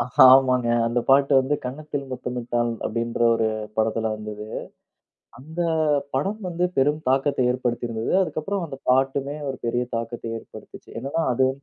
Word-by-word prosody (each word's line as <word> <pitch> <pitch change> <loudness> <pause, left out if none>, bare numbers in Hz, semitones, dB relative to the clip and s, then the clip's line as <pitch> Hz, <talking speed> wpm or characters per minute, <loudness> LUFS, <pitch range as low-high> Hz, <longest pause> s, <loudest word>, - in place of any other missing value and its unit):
ஹா, - - +9
ஆமாங்க. 130 -2 +2 0.2
அந்த 120 +1 +1
பாட்டு 140 +1 +5
வந்து, 135 +3 0
"கன்னத்தில் 145 +1 -5
முத்தமிட்டால்" 120 -1 -2
அப்படின்ற 115 +1 -2 0.2
ஒரு 110 -1 +1 0.3
படத்துல 110 0 0
வந்தது. 105 0 -7 0.9
அந்த 160 +6 -7 0.5
படம் 195 +11 -1
வந்து 175 +1 -1
பெரும் 150 +3 +2
தாக்கத்தை 135 -1 +2
ஏற்படுத்தி 120 -1 -2
இருந்தது. 110 0 -3
அதற்கப்புறம், 185 +3 -3
அந்த 135 - -8
பாட்டுமே 135 +2 +1
ஒரு 135 - -7
பெரிய 120 +1 0
தாக்கத்தை 115 0 -5
ஏற்படுத்துச்சு. - - -13
என்னன்னா 140 +6 -1
அது 130 +1 +3
130 Hz, 140 wpm, -24 LUFS, 115-145 Hz, 0.9 s, ஹா